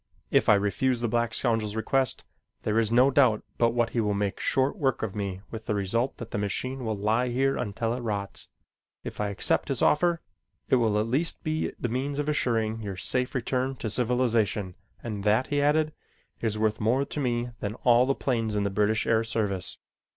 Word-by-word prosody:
If - - +3
I - - +8
refuse 105 +6 +1
the 120 - +1
black 120 0 0
scoundrel's 110 -3 0
request, 130 +3 0 0.4
there 110 +1 +1
is 110 -1 +1
no 125 +3 +5
doubt 130 -6 +3 0.2
but 115 - +4
what 120 -1 +1
he 120 - 0
will 105 -2 0
make 100 -1 -2
short 135 +1 +1
work 135 - 0
of 105 -3 -2
me 100 -2 -3
with 110 -1 -7
the 105 - 0
result 115 +6 -1
that 115 -1 -8
the - - -2
machine 130 +6 -3
will 110 -2 -2
lie 110 +5 +1
here 135 +3 +1
until 115 0 -2
it 125 - -4
rots. 100 -4 -4 0.5
If - - -5
I 105 - 0
accept 100 - +2
his - - 0
offer 170 +2 +3 0.5
it 130 - +5
will 110 -3 +2
at 105 - +1
least 140 +9 0
be 155 0 -1
the - - -1
means 135 +4 -2
of 145 0 -1
assuring 115 -6 0
your 100 -3 -5
safe 125 +6 -1
return 130 +1 -1
to 110 -3 -4
civilization 115 -5 +1 0.3
and 105 -4 -4
that" 110 +5 +3
he 145 - +2
added, 155 +1 +2 0.5
"is 110 -2 -1
worth 110 0 0
more 125 +6 +2
to 150 - -6
me 120 -2 -1
than 105 +1 -3
all 120 +1 +5
the 135 - +2
planes 115 -5 -1
in 105 - +1
the 100 - -1
British 105 +2 +1
Air 115 -1 +2
Service." 105 -5 -1
115 Hz, 205 wpm, -27 LUFS, 105-130 Hz, 0.5 s, I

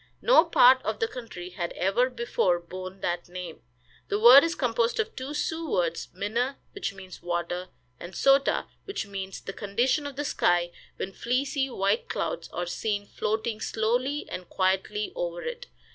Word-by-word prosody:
No - - +7
part 255 +1 +6
of 215 0 -2
the 225 - +1
country 225 -8 -8
had 175 -2 -4
ever 200 +8 +2
before 235 -7 +1
borne 185 +2 -8
that 175 0 -2
name. 180 -2 -7 0.5
The 205 - 0
word 245 +5 +10
is 330 +1 0
composed 235 - 0
of 445 +1 -1
two 270 +3 -5
Sioux 320 +1 -2
words, 170 -5 0
"Minne," 230 +8 -1 0.2
which 400 - -3
means 190 -2 -11
water, 175 +1 -2 0.3
and 175 +2 -9
"Sota," 275 0 +3 0.2
which 395 - -3
means 195 -1 -6
the 195 - -6
condition 240 +10 0
of 280 - -8
the 290 +2 -3
sky 175 -8 +2 0.2
when 195 - -5
fleecy 265 +4 0
white 200 -1 0
clouds 165 - -3
are 175 - -3
seen 205 +3 -2
floating 220 +2 -2
slowly 245 +6 0
and 180 -1 -7
quietly 190 +3 0
over - - -3
it. 485 +1 -5
215 Hz, 165 wpm, -27 LUFS, 185-265 Hz, 0.5 s, word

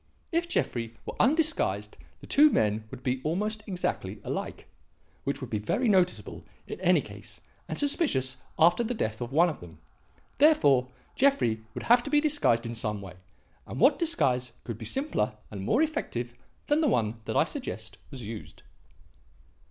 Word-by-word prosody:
If 340 +1 0
Jeffrey 115 - -2
were - - -5
undisguised 315 +4 +1 0.3
the - - -10
two 300 +2 +6
men 110 - +1
would 125 - -10
be 130 0 -1
almost 210 +7 -1
exactly 110 - -3
alike; - - -5 0.6
which 140 +1 -2
would 130 - -7
be 105 - 0
very 215 - 0
noticeable 185 -4 +1 0.2
in - - -7
any - - +4
case - - -11 0.3
and - - -4
suspicious 280 - 0 0.2
after 175 +8 +5
the 240 +2 -2
death 110 - -2
of 120 +1 -4
one 165 +5 +5
of 160 - -4
them. 85 -2 -12 0.6
Therefore 145 - +5 0.3
Jeffrey 255 - +2
would - - -5
have 240 +1 +5
to 280 - -6
be 295 +1 +4
disguised 290 - +2
in 115 - -4
some 105 -2 -1
way; 95 -3 -9 0.5
and - - -6
what 265 +6 +5
disguise 130 - +1
could 115 -3 -6
be 110 - -7
simpler 270 - -1 0.2
and 100 -2 -6
more 235 - +2
effective 125 - -3 0.3
than 295 +2 +2
the 310 - +3
one 115 - 0
that - - -1
I - - +6
suggest 110 +4 -7
was 135 -4 -8
used? 110 0 -8
140 Hz, 170 wpm, -28 LUFS, -, 0.6 s, two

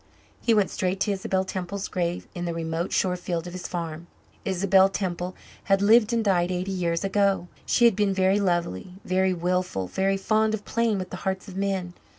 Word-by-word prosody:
He 230 - +3
went 205 -3 +2
straight 185 +1 -1
to 205 - +2
Isabel 190 -1 -1
Temple's 190 +1 -4
grave 175 -1 -2
in 175 0 -4
the 170 -1 -3
remote 165 +1 -2
shore 185 -1 +1
field 175 -2 -3
of 175 - -7
his 185 -1 -5
farm. 170 -1 -5 0.4
Isabel 190 0 +4
Temple 180 -2 -3 0.3
had 195 -1 +3
lived 215 +2 +5
and 230 -1 0
died 180 -3 +2
eighty 185 +1 -2
years 170 -2 -1
ago. 195 -2 +1 0.2
She 240 - +4
had 235 - +5
been 205 -1 +2
very 190 +1 +2
lovely, 175 - -1
very 185 +1 +2
wilful, 180 - -1
very 195 - 0
fond 215 +2 +2
of 205 - -10
playing 230 -2 +1
with 185 -1 -5
the - - -5
hearts 190 +1 -2
of 190 - -9
men. 190 -2 -2
190 Hz, 195 wpm, -25 LUFS, 175-200 Hz, 0.4 s, lived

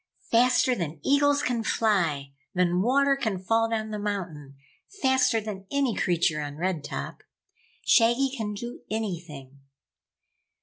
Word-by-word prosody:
"Faster 250 +2 +4
than 165 -8 -4
eagles 285 +1 +3
can 245 -4 0
fly, 170 -12 0 0.2
than 180 0 +2
water 275 +5 +3
can 220 -8 -2
fall 225 +5 +1
down 220 -1 -2
the 210 - -4
mountain, 175 -9 -5 0.4
faster 260 - +3
than 205 -3 -7
any 280 -4 +1
creature 170 -5 +1
on 145 0 -6
Red 175 -3 -2
Top. - - -6 0.6
Shaggy 240 +3 +4
can 210 -4 -4
do 240 +4 -7
anything!" 170 -11 -5
210 Hz, 130 wpm, -26 LUFS, 175-245 Hz, 0.6 s, Faster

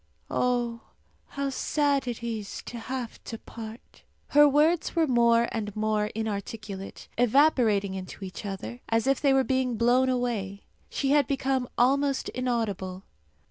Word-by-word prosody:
Oh, 240 -2 0 0.5
how 280 -1 -3
sad 280 -1 +1
it 240 -1 -4
is 220 -3 -4
to 240 - -6
have 250 0 -5
to 225 - -5
part!" 225 +1 -11 0.3
Her 295 0 +7
words 310 +5 +2
were 330 -1 +4
more 235 -3 +4
and 210 -3 -4
more 215 -1 +1
inarticulate, 210 -2 -5
evaporating 240 -6 +3
into 190 +1 -7
each 185 - -8
other, 205 +5 -6
as 225 +1 +2
if 270 0 +2
they 280 - +4
were 270 0 +4
being 260 -3 0
blown 245 +3 +3
away. 230 -6 -2 0.3
She 275 -1 -1
had 290 -3 +4
become 265 -2 0
almost 275 +2 +2
inaudible. 210 -7 -2
240 Hz, 140 wpm, -27 LUFS, 215-270 Hz, 0.5 s, Her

